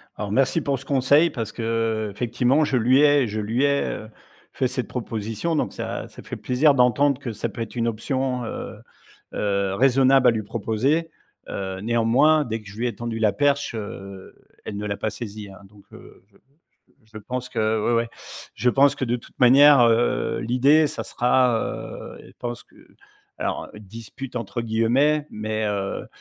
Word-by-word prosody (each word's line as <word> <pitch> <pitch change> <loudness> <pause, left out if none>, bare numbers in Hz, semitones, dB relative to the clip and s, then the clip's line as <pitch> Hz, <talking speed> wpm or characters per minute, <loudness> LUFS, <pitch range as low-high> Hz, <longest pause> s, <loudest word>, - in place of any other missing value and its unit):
Alors 105 -1 -5
merci 135 +7 +2
pour 140 -2 -1
ce 140 - -13
conseil 140 +4 +3
parce 115 -8 -5
que, 115 - -7 0.5
heu, - - -8
effectivement 125 +6 +1
je 140 -3 +1
lui 125 +4 +4
ai 145 -3 +4
je 110 +1 -4
lui 110 +5 -1
ai, 140 0 +2
heu, 110 - -6 0.4
fait 130 - 0
cette 125 0 -3
proposition, 115 +6 -3
donc - - -1
ça, - - -5
ça - - -13
fait - - -7
plaisir 140 +4 +2
d'entendre 135 +2 +3
que 120 -4 -4
ça 105 - -3
peut 115 - -7
être 115 - -6
une 115 -1 0
option, 125 +2 -2
heu - - -6 0.6
heu, 100 -2 -1
raisonnable 135 +1 +4
à - - +4
lui 110 - -2
proposer, 120 +9 -1 0.4
heu, 95 -1 -4
néanmoins, 120 +7 +3
dès 115 -1 -3
que 100 - -16
je 100 - -12
lui 120 +2 -1
ai 115 - -4
tendu 115 +1 -5
la 110 -2 +2
perche, 140 -3 0
heu, 100 -3 -8 0.3
elle 100 - -5
ne 105 - -4
l'a 100 - -3
pas 110 - -2
saisie, 105 -3 -8
hein, 95 - -13
donc 105 -1 -19
heu, - - -15
je - - -24
je - - -33 0.7
je 110 0 -11
pense 125 +3 -5
que 110 -2 0
ouais, - - +2
ouais, 115 0 0 0.5
je 125 - +1
pense 140 +2 +4
que - - -3
de 120 0 0
toute 120 - -16
manière, 140 +2 +7
heu, 115 0 +2
l'idée, 135 +6 +3
ça - - -5
sera, 125 -1 +2
heu, - - -6
elle - - -16
pense 120 -1 -6
que - - -27 0.6
alors, - - -3
heu, - - -10
«dispute» 115 +5 -9
entre 115 +1 -4
guillemets, 125 +7 +2
mais 110 0 -3
heu 100 -1 -3
120 Hz, 190 wpm, -23 LUFS, 110-135 Hz, 0.7 s, manière